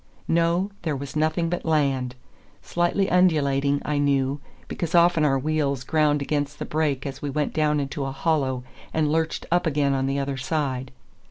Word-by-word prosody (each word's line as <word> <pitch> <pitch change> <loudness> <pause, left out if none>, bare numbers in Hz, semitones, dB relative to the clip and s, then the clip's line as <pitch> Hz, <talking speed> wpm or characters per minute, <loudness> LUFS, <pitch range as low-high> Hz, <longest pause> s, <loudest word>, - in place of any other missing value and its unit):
No, 170 +4 +2
there 155 -4 -1
was 140 +1 -7
nothing 155 +2 +1
but 175 +1 -2
land—slightly 150 +6 -1
undulating, 145 -6 +2
I 150 -1 0
knew, 140 0 +1 0.3
because 170 -1 -3
often 170 -2 +5
our 135 -2 +3
wheels 140 -2 -1
ground 150 0 +2
against 145 0 -2
the - - -4
brake 150 -4 -1
as 135 -1 -6
we 145 - -3
went 150 +2 -1
down 150 -1 +2
into 140 0 -3
a 135 - -3
hollow 135 -3 0 0.3
and 155 -2 +2
lurched 160 0 -1
up 175 0 +2
again 145 -2 +1
on 135 0 0
the 135 +1 -1
other 140 -1 -2
side. 130 -2 -2
145 Hz, 170 wpm, -24 LUFS, 135-160 Hz, 0.3 s, often